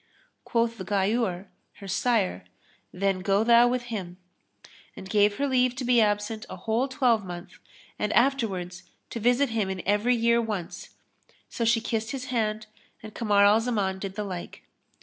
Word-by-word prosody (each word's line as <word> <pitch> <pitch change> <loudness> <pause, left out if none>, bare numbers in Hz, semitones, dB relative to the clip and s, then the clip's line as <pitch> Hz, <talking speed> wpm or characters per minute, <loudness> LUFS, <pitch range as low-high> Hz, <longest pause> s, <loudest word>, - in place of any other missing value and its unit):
Quoth 230 -2 0
Ghayur, 195 0 -1 0.3
her 195 - -11
sire, 185 - 0 0.5
"Then 195 0 0
go 195 +2 +1
thou 235 +1 +6
with 250 0 -1
him," 180 -4 -5 0.8
and 190 - -9
gave 205 0 +2
her 285 - 0
leave 255 -2 +2
to 260 -1 -4
be 240 -1 +4
absent 210 +1 0
a - - -6
whole 230 +4 -1
twelvemonth 220 -10 -1 0.4
and 210 - -1
afterwards 200 -9 0 0.3
to 230 - -4
visit 245 +4 +2
him 220 -4 -1
in 190 -1 -4
every 210 +5 +2
year 235 0 +3
once; 210 -7 -5 0.6
so 235 - -3
she 225 0 +3
kissed 225 0 -3
his 260 -2 -5
hand 215 -2 -1 0.4
and 215 -1 -9
Kamar 205 -3 +3
al 210 +2 +5
Zaman 205 -5 -1
did 195 0 -6
the 210 - -3
like. 185 -4 -7
215 Hz, 160 wpm, -26 LUFS, 195-235 Hz, 0.8 s, thou